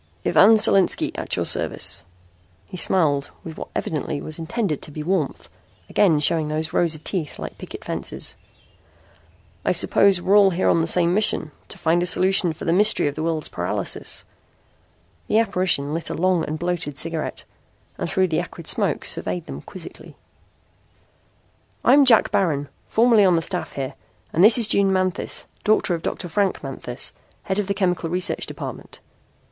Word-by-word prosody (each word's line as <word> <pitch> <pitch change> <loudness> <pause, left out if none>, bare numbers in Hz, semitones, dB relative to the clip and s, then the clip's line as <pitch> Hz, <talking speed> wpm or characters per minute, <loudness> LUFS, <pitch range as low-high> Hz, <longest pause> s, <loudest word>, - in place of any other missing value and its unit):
"Ivan 220 +3 +6
Solinski, 195 -3 +3
at - - -3
your - - -2
service." 95 -3 0 0.6
He - - -11
smiled 150 -6 +1
with 160 -2 -8
what - - -7
evidently 150 -1 -3
was 155 +2 -4
intended 170 - -2
to - - -8
be 150 +1 -7
warmth, 170 -4 -2 0.4
again 170 -7 +3
showing 155 +1 +2
those 155 +2 -3
rows 170 -3 +1
of 155 - -13
teeth 170 -7 -4
like - - -8
picket - - -9
fences. - - -3 1.3
"I - - +1
suppose 195 -2 +4
we're 190 +3 +2
all 200 -2 +6
here 185 0 0
on 165 - +3
the 165 - -1
same 175 0 +3
mission: 200 -6 +2 0.2
to - - -9
find 170 +2 +1
a 175 - 0
solution 185 -1 +3
for 155 - -8
the 165 - +1
mystery 210 +4 +4
of 145 - -2
the 155 - -6
world's 160 -2 -2
paralysis." - - -3 1.0
The 215 - +1
apparition 180 -9 +1
lit 165 +1 -4
a - - -4
long 180 -1 +1
and 155 - -4
bloated 175 -4 -3
cigarette 165 0 -4 0.6
and - - -3
through 185 -1 +1
the 160 - 0
acrid - - -7
smoke - - 0
surveyed 90 -1 -2
them 70 +1 -8
quizzically. - - -10 1.7
"I'm 275 +3 +6
Jack 230 -4 +5
Baron, 145 -7 0 0.2
formerly 230 -2 +4
on 185 -3 +4
the 165 - 0
staff 180 +1 -4
here, 135 -2 -4 0.4
and 170 - +3
this 220 +3 +8
is 230 -3 +4
June 200 -2 +3
Manthis, 185 -1 -1 0.2
daughter 215 -3 +2
of 165 - -3
Dr. 175 - -4
Frank 195 +1 -1
Manthis, 130 -2 -4 0.3
head 190 +1 -2
of 205 - -2
the 200 - -1
chemical 180 -4 -1
research 180 +2 -1
department." - - -8
175 Hz, 170 wpm, -22 LUFS, 155-195 Hz, 1.7 s, this